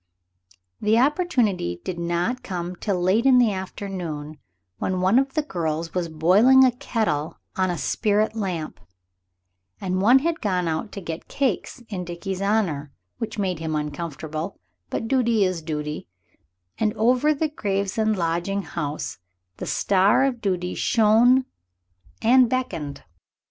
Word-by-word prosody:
The 215 +2 +3
opportunity 245 - +1
did 180 -2 -4
not 175 +9 -1
come 180 -1 -4
till 190 0 -2
late 195 +8 +2
in 260 -2 +6
the 240 -3 +4
afternoon, 175 -6 -5 0.4
when 185 0 -1
one 190 +7 +4
of 270 +2 -2
the 310 - +1
girls 165 - -3
was 175 -2 -1
boiling 200 +12 +5
a 255 - +4
kettle 215 -11 -2 0.2
on 185 -1 +1
a 175 - -2
spirit 215 +5 +1
lamp, 180 -7 -3 1.0
and 185 -1 -1
one 240 +6 +7
had 330 +4 -1
gone 180 -4 0
out 160 +6 -2
to 200 - -6
get 165 -2 -6
cakes 265 -2 -2
in 190 -5 -4
Dickie's 180 +2 -5
honor, 185 -9 0 0.3
which 225 -2 -4
made 185 -5 -1
him 160 -1 -2
uncomfortable, 155 +1 -4 0.3
but 225 - -3
duty 235 -4 +2
is 185 -3 0
duty, 150 - -4 0.7
and 215 0 +1
over 250 +7 +3
the 305 +1 0
Gravesend 205 -3 -1
lodging 175 +4 -1
house 150 - -4 0.4
the - - -6
star 200 +5 +3
of 250 -4 -2
duty 180 -2 -1
shone 235 +4 +4 0.8
and 250 +1 +6
beckoned. 165 - -3
195 Hz, 140 wpm, -24 LUFS, 170-230 Hz, 1.0 s, one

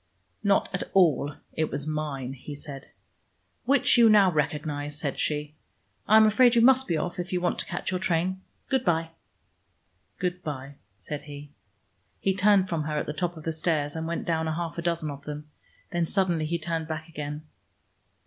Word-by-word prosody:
"Not 200 -1 +3
at 195 - -1
all: 150 -6 +4 0.2
it 160 -1 0
was 140 - -4
mine," 150 -4 -3
he 140 +2 -8
said. 140 -2 -8 0.8
"Which 270 -2 +4
you 230 -1 +8
now 200 -3 +6
recognize," 150 -1 -2
said 140 -4 -3
she. 150 0 -1 0.5
"I 215 - +7
am 220 - +8
afraid 240 +3 +5
you 230 - +5
must 265 +1 +5
be 165 - +1
off, 175 +3 -3
if 175 0 -4
you 180 - +1
want 175 0 0
to - - -3
catch 175 - -3
your 185 - -1
train. 185 +1 0 0.3
Good 265 -2 +1
by." 165 -3 +1 1.1
"Good 180 0 -2
by," 140 -2 -6 0.2
said 140 +9 -5
he. 145 0 -9 0.7
He 195 - +1
turned 200 -1 +4
from 165 -4 -2
her 150 -1 -2
at - - -1
the 150 - -4
top 175 +1 -2
of 155 - -9
the 165 - -2
stairs, 155 -2 0
and 160 0 -3
went 170 - -3
down 160 -1 0
a 160 - -1
half 170 -1 -3
dozen 170 -3 -1
of 140 0 -10
them. 150 0 -7 0.4
Then 175 -1 0
suddenly 175 -5 +1
he 170 +2 0
turned 165 -1 -3
back 160 0 -5
again. 150 -1 -6
160 Hz, 190 wpm, -27 LUFS, 150-180 Hz, 1.1 s, you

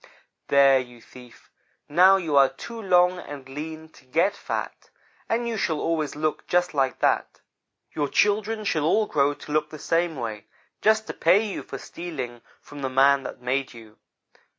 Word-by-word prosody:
"'There, 140 -1 +5
you 120 -2 -9
thief 125 0 -16 0.4
now 185 +5 +6
you 165 -6 -2
are 135 -1 +6
too 230 -1 -9
long 180 -2 +3
and 140 -5 -9
lean 155 +3 -7
to 155 - -21
get 165 +10 +1
fat, - - -5 0.4
and 235 +1 0
you 230 -1 -2
shall 160 -6 -1
always 160 -3 -1
look 155 +1 -2
just 180 0 +1
like 135 -2 0
that. - - 0 0.5
Your 145 -1 -1
children 215 +6 +1
shall 160 -7 0
all 215 +7 +3
grow 145 -5 +1
to 150 - -11
look 155 0 0
the 155 - -9
same 165 +2 0
way, 110 -5 -6 0.3
just 220 0 +3
to - - -6
pay 190 +6 +3
you 205 - -4
for - - -9
your - - -8
stealing 130 -9 -6 0.2
from 145 -1 -11
the 135 - -2
man 135 +1 +4
that 125 -1 -9
made 130 0 -2
you. 110 -2 -15
155 Hz, 180 wpm, -25 LUFS, 135-180 Hz, 0.5 s, now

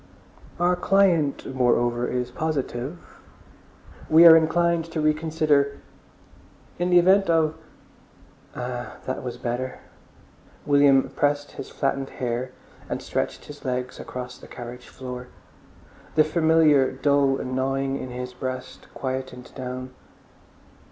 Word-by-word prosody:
"Our 175 +1 +3
client 175 -8 +2
moreover 120 -1 +2
is 125 0 -2
positive.... 140 -1 -3 1.1
We 165 +2 +8
are 165 -1 +11
inclined 170 +1 +2
to 165 -1 -5
reconsider... 155 -2 +1 1.0
in 175 +1 0
the 180 - +5
event 190 +2 +5
of—" 160 -2 +3 1.0
Ah, 125 0 -5
that 130 - -3
was 125 -1 -6
better. 125 +1 -3 0.9
William 140 -2 +5
pressed 145 0 0
back - - -17
his - - -7
flattened 135 -1 -2
hair 125 +1 -3 0.4
and - - -2
stretched - - -3
his 145 0 -11
legs 125 -1 -3
across 125 0 -7
the - - -13
carriage 125 0 -9
floor. 125 -1 -8 0.9
The 155 - +6
familiar 155 -3 +4
dull 140 -2 +2
gnawing 135 +1 -1
in 130 - -6
his 125 0 -6
breast 130 0 -6
quietened 130 -1 -5
down. 130 0 -6
135 Hz, 120 wpm, -24 LUFS, 125-155 Hz, 1.1 s, are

